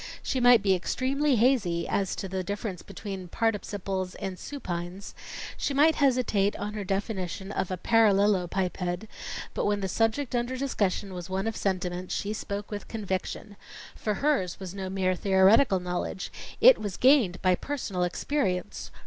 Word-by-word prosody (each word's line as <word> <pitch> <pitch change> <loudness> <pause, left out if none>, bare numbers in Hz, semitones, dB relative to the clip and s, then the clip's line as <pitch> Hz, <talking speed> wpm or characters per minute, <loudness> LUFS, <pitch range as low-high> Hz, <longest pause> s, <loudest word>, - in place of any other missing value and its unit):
She 265 - -1
might 245 -3 +6
be 195 -2 +4
extremely 265 +9 +1
hazy 215 -8 +2
as 195 -2 0
to 195 - -4
the 190 0 -3
difference 200 -1 -4
between 195 -3 -7
participles 195 -3 -2
and 190 -1 -4
supines, 185 -7 -5 0.4
she 280 - -1
might 310 +3 +6
hesitate 245 -8 +2
on 210 +1 -4
her 210 -1 -4
definition 195 -1 -3
of 190 - -2
a 185 - -2
parallelopiped, 190 -3 +2 0.5
but - - -1
when 205 0 +1
the 190 - -1
subject 225 +7 0
under 245 +1 -1
discussion 205 -7 -1
was 180 0 -7
one 190 +2 -1
of 225 -1 -2
sentiment, 180 -2 -2
she 205 +1 -2
spoke 205 -1 -5
with 205 -1 -5
conviction. 205 -1 -4 0.4
For 210 -1 -2
hers 270 - 0
was 190 -2 -6
no 190 -1 -4
mere 185 -1 +1
theoretical 190 +3 +4
knowledge; 180 +1 -4 0.3
it - - +8
was 205 -4 -4
gained 250 -9 +4
by 185 -1 +5
personal 205 -4 -3
experience. 180 - -1
200 Hz, 155 wpm, -28 LUFS, 185-225 Hz, 0.5 s, it